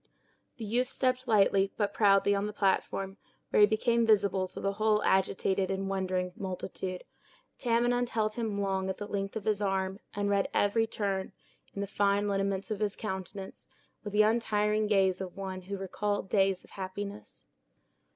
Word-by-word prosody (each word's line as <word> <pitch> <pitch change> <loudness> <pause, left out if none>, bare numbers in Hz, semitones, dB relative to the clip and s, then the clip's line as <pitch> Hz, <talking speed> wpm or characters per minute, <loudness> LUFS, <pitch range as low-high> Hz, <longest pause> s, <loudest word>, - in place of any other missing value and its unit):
The 225 - -5
youth 245 +4 0
stepped 255 -1 0
lightly, 195 -3 +4
but 205 -2 0
proudly 200 -1 +4
on 200 +1 0
the 210 - -5
platform, 195 0 0 0.3
where - - +3
he 205 - +8
became 235 +2 +2
visible 200 -4 +3
to - - -9
the 195 - 0
whole 215 +1 +2
agitated 190 0 +1
and 195 0 -2
wondering 185 -1 -1
multitude. 185 -2 -5 0.6
Tamenund 240 0 +1
held 215 -2 0
him 220 -3 -2
long 190 -1 -1
at 190 - -3
the 205 - -5
length 195 -1 -3
of 220 - -3
his 210 -1 0
arm 190 -1 -1 0.2
and 205 0 0
read 200 -1 +1
every 225 +2 +3
turn 195 -3 -2 0.4
in 200 - -3
the - - -1
fine 200 +1 +1
lineaments 195 +1 -1
of 215 - -2
his 210 -1 0
countenance, 190 -1 -6 0.4
with 205 -1 -6
the 210 0 +5
untiring 215 -1 +1
gaze 195 -3 +2
of 185 0 -6
one 190 -1 -5
who 200 +2 -5
recalled 195 +1 -2
days 195 -2 +2
of - - -20
happiness. 200 +2 -7
200 Hz, 170 wpm, -30 LUFS, 195-215 Hz, 0.6 s, he